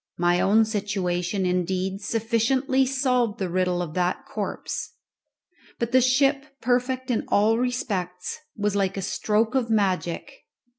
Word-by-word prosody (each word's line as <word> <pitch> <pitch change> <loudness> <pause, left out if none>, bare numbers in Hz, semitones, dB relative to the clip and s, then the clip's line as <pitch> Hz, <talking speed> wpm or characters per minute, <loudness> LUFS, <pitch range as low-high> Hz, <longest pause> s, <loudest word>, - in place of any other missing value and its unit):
My 175 0 +2
own 220 +3 +4
situation, 195 -3 -1
indeed, 185 +2 -1
sufficiently 235 +5 +1
solved 250 -4 +1
the 190 -2 -2
riddle 180 -1 +1
of 155 -3 -7
that 180 0 -1
corpse. - - -4 0.8
But 235 0 -2
the 255 +1 +5
ship, 270 +2 +3 0.2
perfect 250 +1 0
in 230 - 0
all 220 +3 +3
respects, 195 -8 -2 0.2
was 205 -1 0
like 195 -1 0
a 195 - -2
stroke 220 +4 0
of 255 -4 0
magic. 200 +4 -1
210 Hz, 135 wpm, -25 LUFS, 185-250 Hz, 0.8 s, the